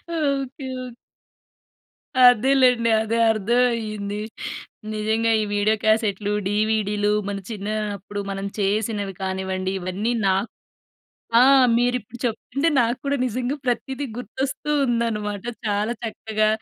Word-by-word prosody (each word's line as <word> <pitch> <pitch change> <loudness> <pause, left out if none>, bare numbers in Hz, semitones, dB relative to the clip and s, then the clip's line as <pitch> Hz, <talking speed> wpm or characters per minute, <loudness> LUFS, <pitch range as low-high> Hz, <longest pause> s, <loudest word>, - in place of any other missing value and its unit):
Okay. 275 -3 -1 0.2
Okay. 245 -2 -10 1.3
అదేలెండి. 250 -1 +5
అదే 225 +1 -1
అర్థవయ్యింది. 215 -2 0 0.7
నిజంగా 220 +2 +1
ఈ - - +1
వీడియో 205 +1 +2
క్యాసెట్‌లు, 210 -2 +1
డీవీడీలు 210 0 +1 0.2
మన 200 - -3
చిన్నా 210 -1 -4 0.2
అప్పుడు 205 +2 -7
మనం 195 0 -4
చేసినవి 205 0 0
కానివ్వండి, 190 0 -2
ఇవన్నీ 190 +6 -2
నాక్ 195 +3 +1 0.9
ఆ! - - +7 0.4
మీరిప్పుడు 245 -1 -1
చెప్తుంటే 250 +6 -1
నాకు 240 +1 +2
కూడా 280 0 +1
నిజంగా 250 +3 -2
ప్రతీదీ 265 +3 -1
గుర్తొస్తూ 265 +5 -4 0.2
ఉందనమాట. 215 -4 -1 0.2
చాలా 210 +2 0
చక్కగా, 220 -1 -1
220 Hz, 105 wpm, -23 LUFS, 205-245 Hz, 1.3 s, ఆ